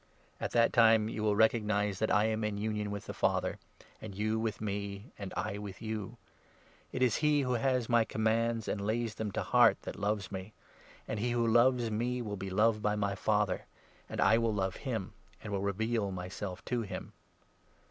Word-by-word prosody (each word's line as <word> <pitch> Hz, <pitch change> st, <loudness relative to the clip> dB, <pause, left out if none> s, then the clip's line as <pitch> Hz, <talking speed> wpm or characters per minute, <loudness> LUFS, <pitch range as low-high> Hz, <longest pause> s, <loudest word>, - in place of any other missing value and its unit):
At -, -, -2 dB
that 115 Hz, 0 st, +4 dB
time 110 Hz, -2 st, +5 dB
you 110 Hz, -, -4 dB
will 105 Hz, -1 st, +2 dB
20 -, -, -3 dB
recognize 105 Hz, -3 st, +2 dB
that 110 Hz, -, +1 dB
I 105 Hz, +3 st, +4 dB
am 110 Hz, 0 st, 0 dB
in 105 Hz, -1 st, -1 dB
union 105 Hz, 0 st, -2 dB
with 100 Hz, 0 st, -5 dB
the -, -, -6 dB
Father, -, -, 0 dB, 0.4 s
and 105 Hz, -3 st, -7 dB
you 110 Hz, +2 st, 0 dB
with 110 Hz, -1 st, -2 dB
me, 100 Hz, +1 st, -4 dB
and 100 Hz, -2 st, -5 dB
I 100 Hz, -, -2 dB
with 100 Hz, -2 st, -7 dB
you. 110 Hz, +1 st, -5 dB, 0.7 s
It 130 Hz, -, 0 dB
is 125 Hz, -4 st, +3 dB
he 150 Hz, -1 st, +3 dB
who 125 Hz, -2 st, 0 dB
has 125 Hz, -1 st, +1 dB
my 120 Hz, -2 st, +4 dB
commands 110 Hz, +1 st, 0 dB
and 105 Hz, -, -1 dB
21 100 Hz, -, -3 dB
lays 115 Hz, 0 st, 0 dB
them 110 Hz, -1 st, -4 dB
to -, -, -1 dB
heart -, -, +4 dB
that -, -, -6 dB
loves 100 Hz, -1 st, -1 dB
me; 95 Hz, +2 st, -6 dB, 0.5 s
and 110 Hz, -, -3 dB
he 120 Hz, +3 st, 0 dB
who 120 Hz, -1 st, +1 dB
loves 120 Hz, 0 st, +4 dB
me 120 Hz, +3 st, -1 dB
will 105 Hz, -4 st, -4 dB
be 95 Hz, 0 st, -5 dB
loved 105 Hz, +3 st, +2 dB
by 105 Hz, 0 st, +1 dB
my 100 Hz, -1 st, 0 dB
Father, 105 Hz, -1 st, 0 dB, 0.4 s
and -, -, -5 dB
I 110 Hz, +4 st, +5 dB
will 115 Hz, -2 st, +1 dB
love 95 Hz, -1 st, -1 dB
him, 115 Hz, -9 st, -4 dB, 0.3 s
and 105 Hz, -, -5 dB
will 100 Hz, -, 0 dB
reveal 105 Hz, +2 st, 0 dB
my 90 Hz, -1 st, -5 dB
self 95 Hz, -1 st, -6 dB
to 125 Hz, -2 st, -1 dB
him." 95 Hz, -4 st, -6 dB
110 Hz, 210 wpm, -32 LUFS, 100-115 Hz, 0.7 s, time